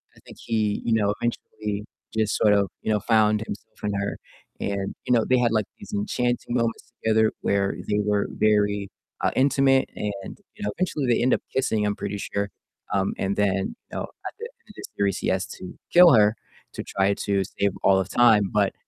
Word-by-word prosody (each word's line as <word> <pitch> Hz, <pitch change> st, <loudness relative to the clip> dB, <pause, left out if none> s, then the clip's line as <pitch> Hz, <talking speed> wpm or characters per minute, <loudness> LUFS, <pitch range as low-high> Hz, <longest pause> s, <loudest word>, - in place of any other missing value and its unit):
I -, -, -18 dB
think -, -, -13 dB
he, 110 Hz, -3 st, -1 dB
you 115 Hz, -, +2 dB
know, 105 Hz, -2 st, +2 dB
eventually 105 Hz, -3 st, -3 dB, 0.3 s
just 110 Hz, -2 st, +1 dB
sort 105 Hz, -1 st, +4 dB
of, 100 Hz, -2 st, +2 dB
you 110 Hz, -, -1 dB
know, 105 Hz, -, +2 dB
found 110 Hz, -1 st, +3 dB
himself 105 Hz, -, -9 dB
in 105 Hz, -1 st, -1 dB
her 100 Hz, 0 st, -2 dB, 0.4 s
and, 100 Hz, -1 st, -2 dB
you 125 Hz, -, +2 dB
know, 115 Hz, -2 st, +4 dB
they 130 Hz, -, +5 dB
had, 120 Hz, -2 st, +2 dB
like, 110 Hz, -3 st, +1 dB
these -, -, -11 dB
enchanting 120 Hz, +4 st, -1 dB
moments 115 Hz, -1 st, -1 dB
together 110 Hz, 0 st, +3 dB
where 100 Hz, -1 st, +1 dB
they 105 Hz, 0 st, +1 dB
were 105 Hz, -1 st, +1 dB
very, 105 Hz, -2 st, +1 dB, 0.3 s
uh, -, -, +2 dB
intimate 135 Hz, 0 st, +3 dB
and, 100 Hz, -2 st, -5 dB, 0.2 s
you -, -, -8 dB
know, 105 Hz, -, -1 dB
eventually 160 Hz, -6 st, -1 dB
they 120 Hz, -1 st, +2 dB
end 125 Hz, -, +3 dB
up -, -, +1 dB
kissing, 110 Hz, -5 st, +1 dB
I'm 105 Hz, -, 0 dB
pretty 100 Hz, -, -4 dB
sure, 100 Hz, 0 st, -3 dB, 0.4 s
um, 95 Hz, 0 st, +1 dB
and 95 Hz, +1 st, -1 dB
then, 100 Hz, -2 st, +2 dB, 0.4 s
you -, -, -5 dB
know, -, -, -2 dB
at -, -, -9 dB
the 460 Hz, -, -5 dB
end 475 Hz, -, -15 dB
of -, -, -12 dB
the -, -, -10 dB
series 100 Hz, -2 st, +1 dB
he -, -, -3 dB
has 95 Hz, 0 st, +1 dB
to 90 Hz, -, -9 dB, 0.2 s
kill 175 Hz, -3 st, +9 dB
her 105 Hz, 0 st, +5 dB, 0.4 s
to -, -, -5 dB
try 100 Hz, +1 st, +1 dB
to 100 Hz, -1 st, 0 dB
save 100 Hz, +1 st, -1 dB
all 95 Hz, -1 st, +5 dB
of 95 Hz, 0 st, -2 dB
time, 110 Hz, -5 st, +4 dB
but, 105 Hz, -2 st, +2 dB
105 Hz, 210 wpm, -24 LUFS, 100-115 Hz, 0.4 s, kill